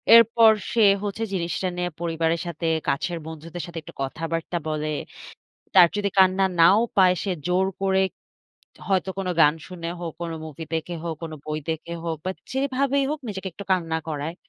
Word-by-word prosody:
এরপর 230 -1 +7 0.2
সে 230 - +3 0.2
হচ্ছে, 205 +2 -3
জিনিসটা 175 +1 -1
নিয়ে 180 0 -1
পরিবারের 165 -1 0
সাথে, 170 0 -4 0.2
কাছের 170 +5 -1
বন্ধুদের 160 +1 -7
সাথে, 170 -1 -9
একটু 170 +2 -12
কথাবার্তা 165 +5 -3
বলে। 155 0 -2 0.8
তার 180 -2 +9
যদি 205 -1 +1
কান্না 190 0 +5 0.2
নাও 195 +6 +7 0.2
পায়, 185 -2 +6
সে 200 - -2 0.2
জোর 180 +1 +2 0.2
করে 190 0 +3 0.9
হয়তো 190 -1 +1
কোনো 190 -2 -1
গান 150 -1 +6
শুনে 170 -2 -6
হোক, 170 -2 -4
কোনো 165 -1 -3
মুভি 160 +1 -7
দেখে 165 +2 -3
হোক, 165 -1 -2
কোনো 160 -1 -5
বই 155 0 -2
দেখে 160 +1 -4
হোক 165 -1 -2
বা 185 - -1 0.2
যেভাবেই 275 +1 +1
হোক 310 - -2
নিজেকে 190 -2 -4
একটু 200 - -9
কান্না 165 -3 0
করায়। 155 +1 -3
175 Hz, 170 wpm, -24 LUFS, 160-195 Hz, 0.9 s, তার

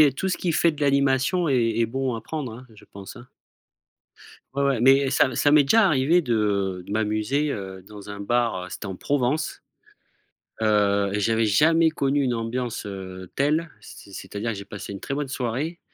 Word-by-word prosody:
est 140 -3 +5
tout 190 - -2
ce - - -2
qui 170 -3 -1
fait 170 - +3
de 150 - -12
l'animation 140 +4 +2
est 115 -3 +1
est - - +4
bon 130 +1 -2
à 110 - -6
prendre, 145 -6 -5
hein, 125 +3 -12
je 105 - -17
pense, 100 -1 -10
hein. 120 - -12 1.3
Ouais, 140 - 0
ouais 135 -5 +1
mais 135 +2 +5
ça 130 -1 +2
ça 145 - +3
m'est 150 0 +6
déjà 210 +10 +4
arrivé 155 +1 +3
de 100 - -1
de 100 - -6
m'amuser, 110 +7 0
heu, 95 -3 -7
dans 105 -1 -10
un 100 0 -7
bar, 115 -3 0
heu, - - -11
c'était 95 - -8
en 95 -2 -5
Provence, 145 +5 -1 1.0
heu 100 -2 +2
et 105 - -1
j'avais 115 +2 +1
jamais 160 +10 +4
connu 140 -2 0
une 130 -2 0
ambiance, 115 0 -3
heu, 95 -2 -8
telle. 155 +4 0
C'est 100 - -13
c'est-à-dire 105 +4 -5
j'ai 100 0 -7
passé 100 0 -8
une 100 - -7
très - - -6
bonne 145 -1 -3
soirée, 135 +7 -3
120 Hz, 195 wpm, -24 LUFS, 105-140 Hz, 1.3 s, m'est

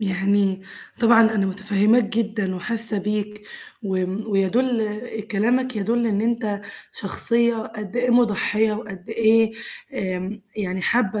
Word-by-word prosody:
يعني 195 0 +1 0.4
طبعًا 230 -1 +6
أنا 200 -2 +1
مُتفهِماك 205 +4 +2
جدًا 215 -3 -1
وحاسة 225 +2 +1
بيك، 210 +1 -3 0.4
وم 190 +1 -2
ويَدُل 215 +2 +1 0.3
كلامك 245 +4 +1
يَدُل 230 +3 0
إن 205 -2 0
أنت 225 -3 -1 0.3
شخصية 235 +4 +2
قد 215 -1 -6
إيه 245 +1 +1
مُضحِيّة 220 -2 +2
وقد 210 -3 -8
إيه 225 0 +3 0.4
آمم، 190 0 -4
يعني 190 -2 -3
حابة 215 +1 +1
210 Hz, 120 wpm, -22 LUFS, 195-230 Hz, 0.4 s, طبعًا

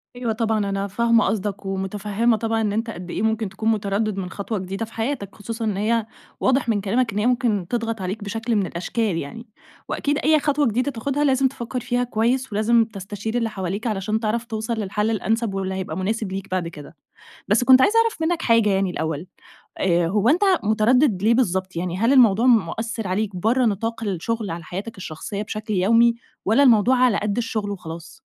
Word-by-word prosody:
أيوة 240 -2 -2
طبعًا 220 -2 0
أنا 195 0 -2
فاهمة 230 +3 +2
قصدك، 205 -1 -2
ومتفهمة 205 +4 0
طبعًا 225 +1 -1
إن 210 -2 0
أنت 225 +2 -1
قد 180 -4 -7
إيه - - -3
ممكن 220 -1 0
تكون 210 +4 -2
متردد 210 -1 -1
مِن 185 -2 -3
خطوة 200 +2 -4
جديدة 195 +4 -4
في 225 - -17
حياتك، 225 -4 -3
خصوصًا 225 +2 -5
إن 210 -3 -1
هي 220 +2 +1 0.3
واضح 260 -2 +2
مِن 205 -3 +1
كلامك، 225 +3 0
إن 205 - -1
هيّ 210 - 0
ممكن 235 -7 +1
تضغط 230 -2 -2
عليك، 195 +3 -4
بشكل 225 +3 -2
مِن 200 -2 +2
الأشكال 185 +2 -2
يعني. 230 - -7 0.4
وأكيد 290 0 0
أي 310 0 +3
خطوة 290 -2 +1
جديدة 250 +6 0
تاخدها، 280 +4 -2
لازم 270 -1 +3
تفكّر 250 -1 -5
فيها 245 +1 -1
كويّس، 245 +2 0
ولازم 225 +2 +3
تستشير 205 +2 -5
اللي 230 -2 0
حواليك 195 +3 -4
علشان 215 +1 -1
تعرف 230 +2 -1
توصل 220 +1 -3
للحل 210 0 -1
الأنسب، 225 0 -1
واللي 190 -1 -2
هيبقى 190 -1 -4
مناسب 205 +1 -2
ليك 195 +1 -5
بعد 185 -2 -1
كده. 160 0 -11 0.5
بس 210 +5 +3
كنت 260 +1 +7
عايزة 445 +11 +4
أعرف 455 -7 0
منّك 325 +1 0
حاجة 230 -2 +3
يعني 195 -1 +1
الأول، 160 0 -3 0.5
آآ، 175 -2 +2
هوّ 210 +5 +2
أنت 340 +7 +3 0.2
متردد 215 0 +3
ليه 225 - +5
بالضبط؟ 190 -6 0
يعني 175 +1 -3
هل 230 +7 +3
الموضوع 235 -3 +5
مؤثر 225 0 +1
عليك 195 +2 -1
برّه 230 +8 +2
نطاق 225 +2 -1
الشغل 210 +2 -2
على 170 0 -6
حياتك 200 +7 -6
الشخصيّة 190 +3 -6
بشكل 215 0 -5
يومي، 230 +5 +4 0.3
والّا 225 +8 +4
الموضوع 245 0 +5
على 250 -4 +3
قَدّ 210 +1 -2
الشغل 215 -3 -2
وخلاص؟ 170 -3 -8
220 Hz, 195 wpm, -22 LUFS, 195-235 Hz, 0.5 s, كنت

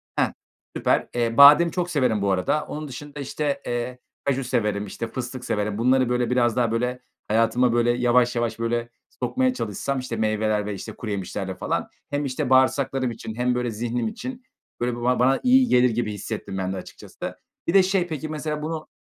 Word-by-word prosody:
Hah. - - +1 0.4
Süper. - - +1
Eee, 115 -1 0
badem 150 +4 +9
çok 180 0 -2
severim 125 - +1
bu 100 0 +1
arada. 95 +11 +1
Onun 150 0 -6
dışında, 145 +2 -8
işte, 140 0 -2
eee, 120 +1 -3 0.3
kaju 135 -1 +1
severim, 105 -5 0
işte, 115 +3 -5
fıstık 125 +1 -6
severim. 105 -2 -1
Bunları 130 +2 +3
böyle 125 -1 +1
biraz 120 -2 +2
daha 120 -3 +1
böyle 125 +2 -1 0.3
hayatıma 115 +3 +3
böyle 120 0 +3
yavaş 125 0 +3
yavaş 120 -1 -1
böyle 115 0 -1 0.2
sokmaya 260 0 0
çalışsam, 130 - -3
işte, 130 -2 -4
meyveler 110 -1 0
ve, 105 - -3
işte, 95 - -7
kuru 110 - -5
yemişlerle 95 -1 -4
falan - - -2 0.2
hem, 145 0 -1
işte, 135 0 -2
bağırsaklarım 130 -1 +3
için 110 -1 -7
hem 125 +1 +1
böyle 125 -1 -1
zihnim 115 +1 -2
için 255 - -6 0.4
böyle 120 0 -1
bu 120 - -7
bana 125 +2 +3
iyi 255 0 +5
gelir 125 - +4
gibi 110 -2 -1
hissettim 105 -1 -5
ben 95 0 -2
de - - -4
açıkçası. 90 - -8 0.3
Bir 170 - +1
de 195 - +7
şey 185 -1 +1
peki, 155 -2 -5
mesela, 150 0 -3
bunu, 155 0 -4
125 Hz, 190 wpm, -24 LUFS, 115-140 Hz, 0.4 s, badem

